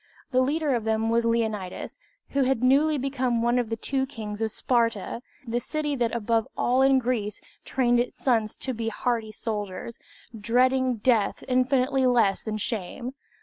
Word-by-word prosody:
The 255 -1 +3
leader 290 +2 +1
of 235 -3 0
them 220 +1 0
was 230 0 +2
Leonidas, 220 -5 -2 0.3
who 280 - +1
had 260 -2 +1
newly 290 +4 +4
become 255 -3 0
one 240 +1 +3
of 240 -3 -2
the 225 - -1
two 265 +3 -1
kings 215 -4 -6
of 220 - +1
Sparta, 230 -1 0 0.2
the 235 0 -1
city 295 +3 -2
that 240 -2 0
above 225 0 +1
all 250 +2 +2
in 270 0 +5
Greece 230 -5 -1 0.3
trained 245 -2 +2
its 245 - -2
sons 225 -5 +1
to 260 - -4
be 225 -1 -3
hardy 225 -1 -1
soldiers, 210 0 -5 0.4
dreading 255 +3 +2
death 220 -2 +1
infinitely 255 +1 +2
less 230 -6 +3
than 215 -1 -3
shame. 225 +4 -4
240 Hz, 165 wpm, -26 LUFS, 220-260 Hz, 0.4 s, in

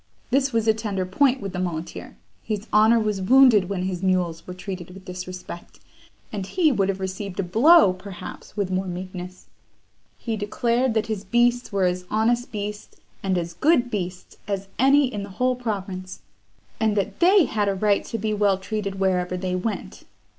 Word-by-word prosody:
This 275 +1 +2
was 225 -2 0
a 220 - +6
tender 210 -4 -3
point 255 +7 +2
with 195 -1 -5
the 180 - -3
muleteer; 170 -2 -5 0.2
his 210 -1 -4
honour 220 +2 +6
was 210 -3 -1
wounded 230 -3 +6
when 190 -2 -2
his 185 -2 -3
mules 180 -3 0
were 180 - -6
treated 185 -2 -7
with 190 +1 -12
disrespect, 180 -1 -8 0.5
and 200 -2 -3
he 315 - +2
would 195 -6 +1
have 195 0 -2
received 190 0 -5
a - - +1
blow, 225 - +6
perhaps, 185 +2 -10
with 200 -2 -1
more 185 +1 -1
meekness. 180 0 -7 0.7
He 225 -2 -3
declared 235 +4 0
that 220 -1 +1
his 215 -3 -4
beasts 240 +4 +2
were 195 -2 +1
as 180 0 -1
honest 235 +3 +1
beasts, 210 0 -6 0.2
and 190 -2 0
as 170 -1 -3
good 255 - +2
beasts, 180 -3 -5
as 200 -1 -3
any 275 +3 +5
in 225 -6 -4
the 200 - -7
whole 255 0 +2
province; 195 -6 -5 0.6
and 220 -2 +1
that 200 - -2
they 370 0 +6
had 210 -4 0
a 195 - 0
right 205 +1 +2
to 230 - -4
be 215 0 -1
well 205 -2 +2
treated 200 0 -4
wherever 185 -1 0
they 180 0 -2
went. 205 +4 -4
200 Hz, 180 wpm, -24 LUFS, 185-225 Hz, 0.7 s, a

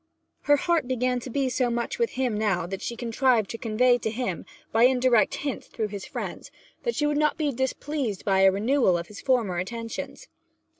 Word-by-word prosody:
Her 290 - +8
heart 330 -3 +1
began 250 0 0
to 250 - -8
be 270 +2 0
so 250 -1 0
much 235 - -2
with 470 -1 0
him 255 -4 0
now 200 -5 0
that 190 +2 -5
she 235 - -4
contrived 235 -2 +1
to 230 - -5
convey 245 +2 +3
to 220 - -2
him, 220 -6 -3 0.2
by 225 +2 +5
indirect 250 -3 +3
hints 280 -3 -4
through 215 -2 -3
his 200 -1 -6
friends, - - -6 0.3
that 475 - -2
she 295 - +1
would 295 0 +1
not 300 0 +2
be 300 -2 0
displeased 265 -3 -3
by 195 -1 +3
a 190 0 +6
renewal 215 -1 +2
of 170 - -6
his 210 - -10
former 230 -9 +1
attentions. 230 +5 -6
240 Hz, 200 wpm, -26 LUFS, 215-265 Hz, 0.3 s, Her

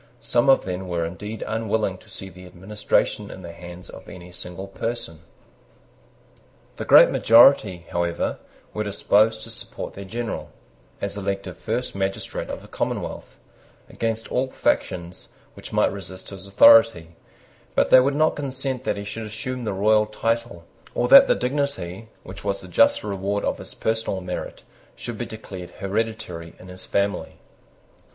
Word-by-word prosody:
Some 120 +3 +2
of 135 - +5
them 95 0 -4
were 85 -2 -1
indeed 105 +6 -6
unwilling 110 -3 -1
to - - -19
see 95 - -7
the 90 0 -13
administration 95 +4 -1
in 95 - -10
the 85 - -7
hands 90 +1 -10
of - - -11
any 90 0 -11
single 90 +2 -7
person. 95 -5 -4 1.6
The - - -4
great - - +8
majority, 110 -7 +5
however, 85 -1 -1 0.3
were 105 - -2
disposed 110 +2 +2
to 115 - -6
support - - -6
their 100 - -8
general, 115 +4 -4 0.5
as 100 0 -3
elective 100 -2 -3
first 120 +3 -3
magistrate 95 0 -3
of - - -6
a - - -13
commonwealth, - - -4 0.5
against 115 0 -2
all 130 +1 +1
factions 90 -7 -2 0.2
which - - -11
might - - +2
resist 95 -2 -8
his 95 0 -9
authority: 100 -4 +6 0.6
but - - +2
they - - +10
would 140 +2 +2
not 155 +1 +3
consent 135 -2 -3
that - - 0
he 100 - -5
should 110 +2 -6
assume 120 +3 -5
the 105 - -1
regal 105 +2 +3
title, 115 -4 -2 0.3
or - - +1
that - - +10
the - - +4
dignity, 125 -7 -3
which 95 - -10
was 100 -1 -1
the 95 - -11
just 90 - +4
reward 100 0 -2
of - - -1
his - - -8
personal 110 -3 -1
merit, 90 -1 -6 0.3
should 115 -3 -7
be 120 - -3
declared 95 -5 -8
hereditary 95 -5 -3
in 90 - -13
his 90 0 -7
family. 100 0 -1
100 Hz, 160 wpm, -23 LUFS, 90-115 Hz, 1.6 s, they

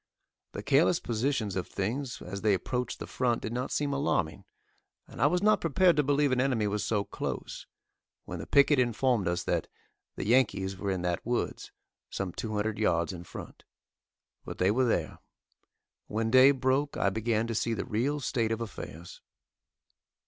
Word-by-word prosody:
The - - -6
careless - - +3
positions 115 -2 -1
of 90 -2 -2
things 120 +6 -3
as 100 +2 -6
they 105 -3 +3
approached 125 +7 -3
the - - -6
front 120 -2 -1
did 110 - -4
not 125 +2 -2
seem 145 -1 -1
alarming, 140 - -1 0.6
and - - -9
I 140 - +6
was 180 +5 +1
not 215 0 +4
prepared 170 +2 +4
to 150 - +4
believe 145 0 +2
an 130 0 +2
enemy 125 -5 +1
was 105 0 -1
so 105 -3 0
close, - - -5 0.6
when - - -6
the - - -7
picket 140 0 +5
informed 120 -3 +1
us 85 0 -1
that - - -1 0.5
"the - - -4
Yankees 105 -5 +2
were 100 +1 -4
in 95 -2 -1
that 90 -1 -1
woods," 120 +1 -2 0.4
some 95 -2 -3
two 110 +1 -4
hundred 105 +1 -1
yards 85 -4 +1
in 85 -1 -8
front. 80 - -10 0.8
But - - -7
they 95 +2 +3
were 130 +4 +2
there. 85 -9 -1 0.9
When 110 +1 -1
day 130 +2 +8
broke, 135 +1 +1
I 100 - +2
began 110 +1 0
to 115 - -3
see 115 +1 0
the - - -3
real 130 +5 -1
state 115 -5 -1
of 115 - -1
affairs. 85 -7 -8
115 Hz, 180 wpm, -29 LUFS, 100-130 Hz, 0.9 s, day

